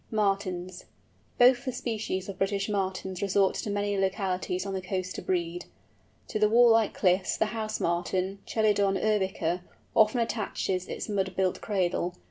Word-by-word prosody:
MARTINS. 195 -4 -1 0.5
Both 245 +1 +6
the 260 - -1
species 220 -6 -3
of 195 -1 -7
British 195 0 0
Martins 190 -2 -2
resort 195 -1 +2
to - - -3
many 205 0 -1
localities 190 -1 -1
on 195 - -3
the 190 - -2
coast 185 -1 -3
to - - -4
breed. 175 -1 -2 0.6
To 215 - -2
the 210 0 +4
wall 235 +1 +6
like 225 -2 +3
cliffs 185 0 +2
the - - +2
House 215 -1 -3
Martin, 185 +3 -1
Chelidon 205 -3 +2
urbica, 190 -5 0 0.3
often 220 +2 +4
attaches 200 -5 -2
its - - -5
mud 195 -3 -1
built 185 -1 0
cradle. 180 -3 -1
195 Hz, 155 wpm, -28 LUFS, 185-215 Hz, 0.6 s, Both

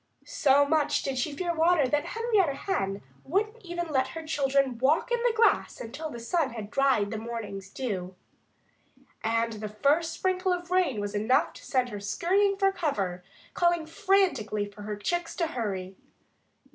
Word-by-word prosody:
So 285 -1 +4
much 295 -1 +2
did 265 -2 -2
she 295 - -1
fear 350 -2 -1
water 325 -3 +3
that 295 +3 0
Henrietta 425 -11 +2
Hen 195 - -2 0.2
wouldn't 425 +8 -1
even 345 -1 -3
let 265 -3 +1
her 325 - -6
children 275 -5 +1
walk 295 - +2
in 480 - +2
the 485 0 +3
grass 455 0 +2
until 285 +7 -6
the 240 - -7
sun 265 +2 0
had 215 -2 -7
dried 255 -7 +2
the 220 - -3
morning's 215 -4 -6
dew. 190 -7 -4 1.1
And 230 +1 +1
the 215 0 -5
first 290 +10 +2
sprinkle 370 0 0
of 355 0 -5
rain 360 - +2
was 205 0 -3
enough 215 +5 +2
to - - -13
send 255 -2 0
her 205 -3 -6
scurrying 385 - +1
for 390 -1 +3
cover, 195 - -2 0.3
calling 345 -2 +2
frantically 320 - +1
for 205 +1 -12
her 210 0 -4
chicks 345 +11 -2
to 340 - 0
hurry. 195 - -4
275 Hz, 170 wpm, -28 LUFS, 215-345 Hz, 1.1 s, So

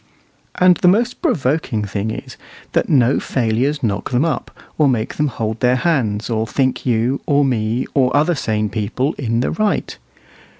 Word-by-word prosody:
And 180 -1 +5
the 190 - +2
most 230 +7 +2
provoking 145 - 0
thing 100 +2 -3
is, - - -7 0.4
that - - 0
no 130 -1 +3
failures 130 +4 -1
knock 100 -4 -1
them 125 +4 +1
up, 165 - -2 0.3
or 150 - +3
make 115 -3 -1
them 150 - +1
hold 110 -4 -3
their 125 0 +3
hands, 125 -9 0
or 110 -1 -1
think 130 +2 -1
you, 120 +3 +1
or 145 -1 +3
me, 115 -1 0
or 130 0 +2
other 155 +4 +3
sane 110 -7 -1
people 120 +7 -1
in 115 -2 0
the - - -1
right. 215 -1 -1
130 Hz, 170 wpm, -18 LUFS, 110-150 Hz, 0.4 s, And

